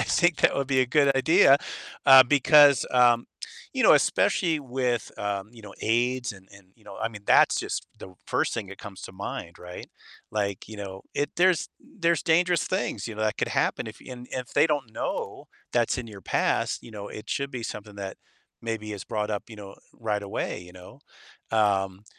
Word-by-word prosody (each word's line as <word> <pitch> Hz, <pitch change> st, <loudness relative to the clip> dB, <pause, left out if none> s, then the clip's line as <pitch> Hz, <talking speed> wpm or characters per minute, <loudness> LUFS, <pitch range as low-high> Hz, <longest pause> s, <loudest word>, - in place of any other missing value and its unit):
I -, -, +3 dB
think 175 Hz, -2 st, +2 dB
that -, -, +3 dB
would 140 Hz, -, -1 dB
be 135 Hz, -1 st, +2 dB
a 130 Hz, -, +2 dB
good 140 Hz, +2 st, +3 dB
idea, 140 Hz, +1 st, +6 dB, 0.5 s
uh, 135 Hz, -1 st, +10 dB
because, 145 Hz, +1 st, +5 dB
um 120 Hz, -1 st, +4 dB, 0.5 s
you -, -, -1 dB
know, -, -, +7 dB
especially 165 Hz, -3 st, +2 dB
with, 125 Hz, -4 st, -2 dB
um, 100 Hz, 0 st, -3 dB
you 120 Hz, -, -14 dB
know, 100 Hz, -2 st, -11 dB
AIDS 120 Hz, +2 st, 0 dB
and 95 Hz, -1 st, -16 dB
and 100 Hz, -2 st, -17 dB
you 115 Hz, -, -26 dB
know, -, -, -11 dB
I 110 Hz, -, -1 dB
mean, 110 Hz, -3 st, -11 dB
that's -, -, +5 dB
just -, -, -4 dB
the 95 Hz, -, -11 dB
1st -, -, 0 dB
thing 105 Hz, -4 st, -4 dB
that 95 Hz, -, -10 dB
comes 100 Hz, -2 st, -10 dB
to -, -, -9 dB
mind, 95 Hz, -3 st, -7 dB
right? 90 Hz, 0 st, -10 dB, 0.4 s
Like, 100 Hz, -3 st, -2 dB
you 110 Hz, -, -9 dB
know, 95 Hz, -1 st, -7 dB
it 145 Hz, -, -1 dB
there's 175 Hz, -2 st, +3 dB
there's 170 Hz, -, -1 dB
dangerous 175 Hz, +1 st, +2 dB
things, 115 Hz, -4 st, -2 dB
you 115 Hz, -, -6 dB
know, 110 Hz, -, -4 dB
that 110 Hz, -1 st, 0 dB
could -, -, 0 dB
happen -, -, 0 dB
if -, -, -9 dB
and 125 Hz, -1 st, -9 dB
if 125 Hz, -2 st, -5 dB
they -, -, +5 dB
don't 145 Hz, -7 st, -2 dB
know -, -, -4 dB, 0.2 s
that's 120 Hz, +1 st, +1 dB
in 125 Hz, -, -5 dB
your 100 Hz, -3 st, -11 dB
past, -, -, 0 dB
you -, -, -12 dB
know, 105 Hz, -2 st, -8 dB
it 105 Hz, -, -10 dB
should 140 Hz, 0 st, -2 dB
be 125 Hz, -3 st, -6 dB
something 105 Hz, -2 st, -7 dB
that 100 Hz, -1 st, -6 dB, 0.5 s
maybe 110 Hz, -2 st, -4 dB
is 100 Hz, -3 st, -7 dB
brought 105 Hz, 0 st, -3 dB
up, 105 Hz, -1 st, -3 dB
you 110 Hz, -, -11 dB
know, 100 Hz, -1 st, -11 dB, 0.2 s
right 105 Hz, -3 st, -3 dB
away, 100 Hz, -3 st, -4 dB
you 90 Hz, 0 st, -14 dB
know? 90 Hz, 0 st, -14 dB, 0.5 s
Um, 100 Hz, -3 st, +1 dB
115 Hz, 205 wpm, -26 LUFS, 100-135 Hz, 0.5 s, uh